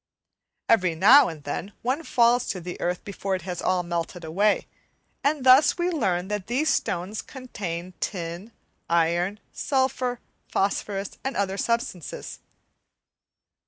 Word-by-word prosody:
Every 185 -7 +3
now 245 - +7
and 155 -3 -9
then 190 +8 -4
one 260 +6 0
falls 245 -4 +3
to 185 - -2
the 180 +1 -7
earth 180 0 -1
before 195 -1 -3
it 185 - -6
is 180 -2 -3
all 180 -1 +1
melted 170 0 -4
away, 200 +6 +1 0.6
and 285 -1 +1
thus 265 +6 +6
we 350 +1 0
learn 190 - 0
that 210 -2 -3
these 275 +6 +1
stones 185 +5 -1
contain 185 - -6
tin, 175 +3 -4 0.4
iron, 170 +4 +1
sulphur, 260 -3 0 0.3
phosphorus, 195 0 -2
and 270 - -3
other 195 -1 0
substances. 230 -6 -3
200 Hz, 130 wpm, -25 LUFS, 175-245 Hz, 0.6 s, now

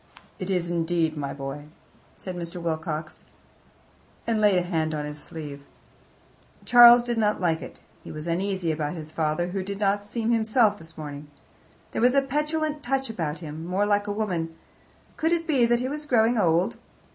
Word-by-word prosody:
"It 185 - -4
is, 175 -2 0
indeed, 165 -1 0
my 140 -2 -3
boy," 140 +1 -6 0.5
said 185 -2 -6
Mr. 170 0 -5
Wilcox, 160 -1 -4 1.0
and 225 -2 0
laid 205 -3 +5
a 180 - +2
hand 160 -3 -1
on 150 -1 -3
his 150 0 -7
sleeve. 145 -3 -7 1.0
Charles 240 0 +9
did 240 -1 -1
not 210 -1 +1
like 165 -3 +1
it; - - -10 0.2
he - - -9
was 155 0 -6
uneasy 180 0 -1
about 155 +1 -2
his 155 -2 -8
father, 160 +2 -1
who 190 +1 -2
did 200 +1 -5
not 205 0 +1
seem 225 +2 -2
himself 220 -2 +3
this 160 0 -10
morning. 145 -1 -7 0.6
There - - -2
was 250 +3 +4
a 275 - +4
petulant 300 +2 -1
touch 270 -1 -1
about 165 -7 -3
him 155 +1 -7
more 185 +4 0
like 205 0 +1
a - - -1
woman. 180 -6 -2 0.6
Could 320 +1 +1
it 335 -1 0
be 265 -7 +3
that 240 0 +2
he 255 - -1
was 295 +2 -5
growing 235 -2 +3
old? 175 -4 +2
185 Hz, 180 wpm, -26 LUFS, 160-230 Hz, 1.0 s, Charles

